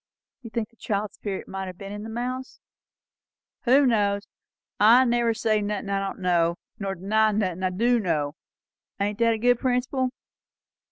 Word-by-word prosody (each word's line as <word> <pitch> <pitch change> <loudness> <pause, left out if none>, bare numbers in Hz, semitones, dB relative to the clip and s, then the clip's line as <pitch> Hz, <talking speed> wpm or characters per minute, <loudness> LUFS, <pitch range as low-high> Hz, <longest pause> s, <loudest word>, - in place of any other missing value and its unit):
"You 235 - -9
think 225 -1 -3
the 230 - -29
child's 205 -1 -2
spirit 200 -2 -5
might 190 0 -5
have 180 -1 -8
been 195 +1 -8
in 205 0 -6
the 220 - -7
mouse?" 250 +3 -4 1.1
"Who 270 +3 +6
knows? 205 -4 +2 0.6
I 235 +5 +7
never 235 -1 +2
say 215 -2 +1
nothin' 205 -1 -3
I 195 - +1
don't 195 0 -3
know, 170 -1 +2 0.2
nor 195 -1 -2
deny 215 +4 +2
nothin' 185 -4 -1
I 185 - +1
du 235 +6 +2
know; 155 -7 -1 0.7
ain't 205 +2 -1
that 230 -1 +4
a - - -4
good 245 +2 +3
principle?" 255 0 0
215 Hz, 170 wpm, -25 LUFS, 195-235 Hz, 1.1 s, I